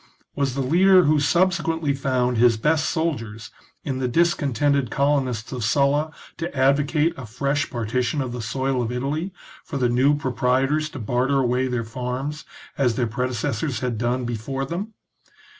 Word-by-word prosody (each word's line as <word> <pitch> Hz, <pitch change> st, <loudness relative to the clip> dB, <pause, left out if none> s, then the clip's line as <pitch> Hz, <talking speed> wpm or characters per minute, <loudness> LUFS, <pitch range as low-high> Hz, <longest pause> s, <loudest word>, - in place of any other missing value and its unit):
Was 135 Hz, -2 st, -1 dB
the 135 Hz, -, -1 dB
leader 185 Hz, +6 st, +5 dB
who 155 Hz, 0 st, +3 dB
subse 175 Hz, +6 st, +2 dB
quently 160 Hz, -4 st, -1 dB
found 125 Hz, -3 st, 0 dB
his 120 Hz, -1 st, +5 dB
best 155 Hz, +6 st, +1 dB
soldiers 115 Hz, -10 st, -3 dB, 0.3 s
in 130 Hz, -1 st, -3 dB
the 130 Hz, -, 0 dB
discontented 140 Hz, -3 st, +1 dB
colonists 135 Hz, -4 st, 0 dB
of 125 Hz, -3 st, -4 dB
Sulla 140 Hz, +5 st, +2 dB, 0.3 s
to 170 Hz, +1 st, -4 dB
advocate 145 Hz, +4 st, +2 dB
a 130 Hz, -4 st, -8 dB
fresh 140 Hz, +6 st, -1 dB
partition 120 Hz, +4 st, -1 dB
of 130 Hz, -3 st, -2 dB
the 120 Hz, 0 st, -5 dB
soil 130 Hz, +3 st, -1 dB
of 120 Hz, -1 st, -2 dB
Italy, 145 Hz, +9 st, -2 dB, 0.3 s
for 140 Hz, -, -5 dB
the 125 Hz, -2 st, +1 dB
new 130 Hz, +5 st, +3 dB
proprietors 135 Hz, +3 st, 0 dB
to 145 Hz, -, -9 dB
barter 125 Hz, +4 st, 0 dB
away 130 Hz, 0 st, +1 dB
their 120 Hz, -2 st, -2 dB
farms 130 Hz, +5 st, -4 dB, 0.3 s
as 125 Hz, -4 st, +2 dB
their 125 Hz, -, +1 dB
predecessors 120 Hz, +2 st, -2 dB
had 125 Hz, -4 st, -2 dB
done 120 Hz, +1 st, 0 dB
before 120 Hz, +4 st, -3 dB
them 195 Hz, +9 st, -5 dB
135 Hz, 160 wpm, -23 LUFS, 125-150 Hz, 0.3 s, leader